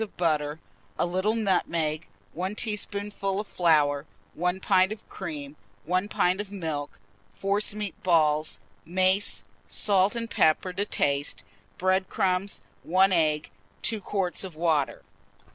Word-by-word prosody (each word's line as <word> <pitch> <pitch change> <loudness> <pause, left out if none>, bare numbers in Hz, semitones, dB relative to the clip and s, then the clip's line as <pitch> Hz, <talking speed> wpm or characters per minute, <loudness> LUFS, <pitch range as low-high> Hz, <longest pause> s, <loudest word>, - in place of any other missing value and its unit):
of 220 - -5
butter, 155 -3 +1 0.4
a - - +2
little 185 +5 +1
nutmeg, 170 -7 0 0.3
1 185 +5 -3
teaspoonful 205 -2 -2
of 210 - -3
flour, 150 -6 +2 0.3
1 180 +3 0
pint 190 0 +3
of 215 - -7
cream, 150 -6 -6 0.3
1 185 +3 +1
pint 185 -1 +1
of 205 -1 -9
milk; 160 -7 -4 0.4
forcemeat 205 0 -1
balls, 155 -3 +2 0.2
mace, 185 +3 +1 0.2
salt 200 +1 +2
and 230 -1 -4
pepper 160 +4 +3
to 200 +3 -1
taste, 140 -7 0 0.3
bread 185 +1 +2
crumbs, 190 +1 0 0.2
1 190 +3 +4
egg, 155 -4 +2 0.3
2 220 -2 0
quarts 190 -2 -2
of 185 -4 -7
water. 155 -4 +1
185 Hz, 125 wpm, -27 LUFS, 160-200 Hz, 0.4 s, 1